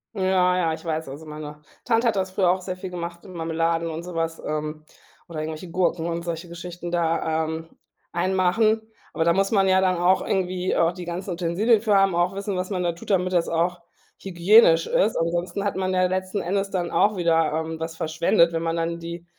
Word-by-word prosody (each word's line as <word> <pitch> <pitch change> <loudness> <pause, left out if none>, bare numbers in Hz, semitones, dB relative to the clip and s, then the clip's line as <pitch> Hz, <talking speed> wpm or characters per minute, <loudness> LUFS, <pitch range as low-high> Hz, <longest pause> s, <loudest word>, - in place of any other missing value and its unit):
Ja, 185 -1 +2
ja, 165 -3 +1
ich 165 - -8
weiß, 160 -3 -2
also 145 +4 -9
meine 150 -1 -8 0.3
Tante 230 +1 +2
hat 225 - +2
das 190 -1 -1
früher 185 -1 +2
auch 185 0 -1
sehr 185 0 -5
viel 185 0 -7
gemacht 170 -1 -6
mit 185 - -12
Marmeladen 165 0 -1
und 160 +1 -5
so 180 0 -8
was, 165 0 -2
ähm, 155 0 -4 0.4
oder 165 -2 -6
irgendwelche 160 +2 -5
Gurken 175 -2 0
und 170 0 -2
solche 170 0 -4
Geschichten 175 0 -7
da, 160 -2 0
ähm, 160 +1 -5 0.4
einmachen. 190 +5 +2 0.3
Aber 160 - 0
da 170 - +4
muss 195 +1 +1
man 195 -3 +3
ja 190 0 +4
dann 185 -1 +2
auch 180 +2 +3
irgendwie 185 -1 -1
auch 165 0 +3
die 180 -1 -8
ganzen 180 +2 -5
Utensilien 185 +6 +2
für 210 -3 +2
haben, 195 -2 +4
auch 175 +3 +1
wissen, 200 -1 -3
was 185 0 -3
man 185 -3 -2
da 175 - +1
tut, 170 +4 -12
damit 185 -1 +1
das 170 -1 +2
auch 170 +1 0 0.4
hygienisch 175 -2 +5
ist. 215 - +1
Ansonsten 175 +4 -1
hat 200 - -1
man 185 0 -1
ja 185 - +2
letzten 185 +2 -2
Endes 195 +3 -1
dann 180 -3 -2
auch 205 -1 +2
wieder, 165 -3 +2
ähm, 160 +1 -3
was 165 0 -5
verschwendet. 165 +1 +2
Wenn 165 - -1
man 165 0 -1
dann 170 0 -2
die 170 +1 -7
175 Hz, 215 wpm, -24 LUFS, 165-185 Hz, 0.4 s, hygienisch